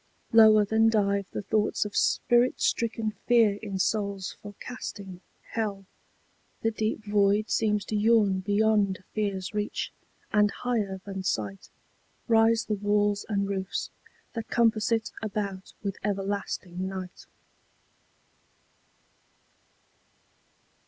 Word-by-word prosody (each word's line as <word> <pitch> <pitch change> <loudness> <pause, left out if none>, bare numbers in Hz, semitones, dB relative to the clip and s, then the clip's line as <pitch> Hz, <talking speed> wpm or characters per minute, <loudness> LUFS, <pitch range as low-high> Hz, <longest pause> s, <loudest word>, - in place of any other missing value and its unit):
Lower 215 -2 +7
than 220 +2 +3
dive 200 -3 +1
the - - -5
thoughts 215 0 +1
of 205 - -7
spirit 240 +1 +2
stricken 225 -1 0 0.2
fear 225 -4 +4
in 200 -3 -4
souls 200 -1 -1
forecasting 200 -3 -8 0.3
Hell, 205 -3 -3 0.8
the 225 - +2
deep 220 0 -2
void 205 +1 +2
seems 210 -2 +1
to 215 - -3
yawn 210 -3 +3
beyond 205 -1 +1
fear's 200 -3 -2
reach, 210 0 -3 0.4
and 210 -1 +5
higher 205 -4 -2
than 195 -1 -5
sight 105 - -3 0.6
Rise 225 0 +4
the 215 - -1
walls 205 0 +1
and 200 -2 0
roofs 190 -1 -3 0.4
that 225 -2 -5
compass 225 -2 +2
it 225 -1 0
about 200 -3 -4
with 200 -2 -3
everlasting 195 -2 -3
Night. 185 -1 -7
205 Hz, 110 wpm, -27 LUFS, 195-220 Hz, 0.8 s, Lower